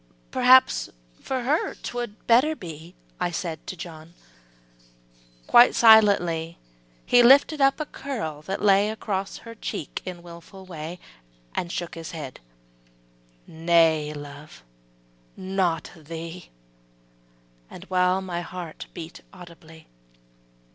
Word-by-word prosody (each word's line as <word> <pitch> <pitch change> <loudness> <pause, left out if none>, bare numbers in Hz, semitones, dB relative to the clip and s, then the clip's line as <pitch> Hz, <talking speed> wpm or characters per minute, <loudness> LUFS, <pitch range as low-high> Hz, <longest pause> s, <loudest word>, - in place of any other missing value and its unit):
``Perhaps 255 +1 +5 0.3
for 260 -2 -3
her 295 +6 0
'twould 240 -3 -6
better 260 +7 +4
be,'' 170 - -10 0.2
I 180 - 0
said 165 -2 -5
to - - -5
John, 165 0 -10 1.3
Quite 240 +1 +6
silently 185 -8 +5 0.5
He 245 - +5
lifted 280 +4 +5
up 275 +2 +3
a 305 - -2
curl 220 - -6
that 190 +6 -5
lay 200 0 +4
Acorss 200 -3 -4
her 230 - -10
cheek 185 -8 -6
in 180 -2 -8
willful 175 +3 -12
way, 165 -1 -7 0.6
And 170 - -3
shook 175 -2 -4
his 165 0 -8
head, 145 -6 -7 1.1
``Nay, 160 -2 +2
love, 145 - -11 0.7
not 185 -4 -1
thee,'' 165 +2 -9 1.2
The - - -11
while 185 +1 +2
my 175 -2 -4
heart 175 -2 -8
beat 165 0 -9
audibly. 165 -3 -14
175 Hz, 115 wpm, -25 LUFS, 165-215 Hz, 1.3 s, Quite